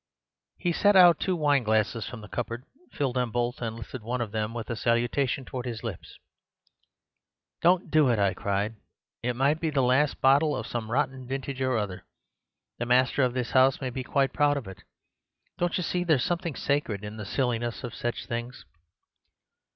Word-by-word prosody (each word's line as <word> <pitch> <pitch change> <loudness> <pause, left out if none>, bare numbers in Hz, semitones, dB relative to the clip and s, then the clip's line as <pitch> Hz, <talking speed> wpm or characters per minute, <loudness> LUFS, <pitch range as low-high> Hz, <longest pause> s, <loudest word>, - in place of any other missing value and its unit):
"He 175 - 0
set 205 +4 +4
out 175 -3 +8
two 185 - 0
wineglasses 115 -8 +1
from 120 -3 -8
the 105 - -10
cupboard, 120 +2 -4 0.3
filled 130 -3 -1
them 125 -1 +1
both, 120 +2 -2
and 115 -2 -3
lifted 115 +2 -8
one 120 +4 -3
of 115 -4 -3
them 110 0 -2
with 115 -2 -5
a - - -1
salutation 120 +4 0
towards 125 -1 -5
his 115 -1 -5
lips. 110 -7 -7 1.4
"'Don't 180 +1 +3
do 155 -4 +5
it!' 120 - +2
I 100 -1 +2
cried. 100 +3 -2 0.4
'It 125 +1 -1
might 140 +5 +2
be 165 - 0
the 140 -3 +1
last 130 +4 +2
bottle 145 +3 +4
of - - -4
some 115 -2 -4
rotten 130 0 -1
vintage 135 0 -4
or 130 -2 +1
other. 100 -4 -3 0.8
The 120 - -2
master 130 +3 +3
of 125 -1 +1
this 125 -1 -2
house 130 0 +4
may 130 -1 -3
be 130 +1 -4
quite 135 0 +1
proud 145 -1 +3
of 135 - -6
it. 95 - -10 0.8
Don't 175 0 +1
you 180 - -1
see 180 +2 -1
there's 155 -7 +2
something 170 -4 -2
sacred 130 -8 -1
in 105 +1 -7
the 105 - -5
silliness 120 +1 -1
of 120 -3 -5
such 120 0 -3
things? 120 +1 -5
125 Hz, 190 wpm, -27 LUFS, 115-140 Hz, 1.4 s, out